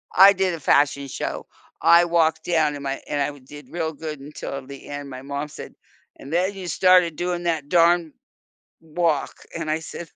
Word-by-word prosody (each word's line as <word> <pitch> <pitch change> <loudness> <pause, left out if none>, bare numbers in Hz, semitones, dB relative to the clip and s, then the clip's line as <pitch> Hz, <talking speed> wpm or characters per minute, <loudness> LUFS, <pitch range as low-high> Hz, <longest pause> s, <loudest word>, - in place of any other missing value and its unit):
I 195 +2 +9
did 185 -1 0
a 165 - -5
fashion 140 0 +2
show. - - -5 0.4
I 170 +1 +6
walked 160 -2 +1
down, 155 -4 +1
and 140 - -8
my 135 0 -3
and 145 - -1
I 145 +1 -2
did 145 +3 -13
real 160 -2 -2
good 155 -1 -6
until 140 -1 -7
the 140 0 -11
end, 145 -1 -6
my 130 0 -8
mom 140 +1 -4
said, - - -10 0.4
"And 140 - -11
then, 185 +4 +1
you 190 -2 -7
started 180 -1 +4
doing 175 0 -2
that 160 -4 -1
darn 170 -2 +3 0.7
walk," 160 -2 -1 0.2
and 165 -2 -4
I 155 +1 0
said 165 +1 -8
160 Hz, 190 wpm, -23 LUFS, 145-175 Hz, 0.7 s, I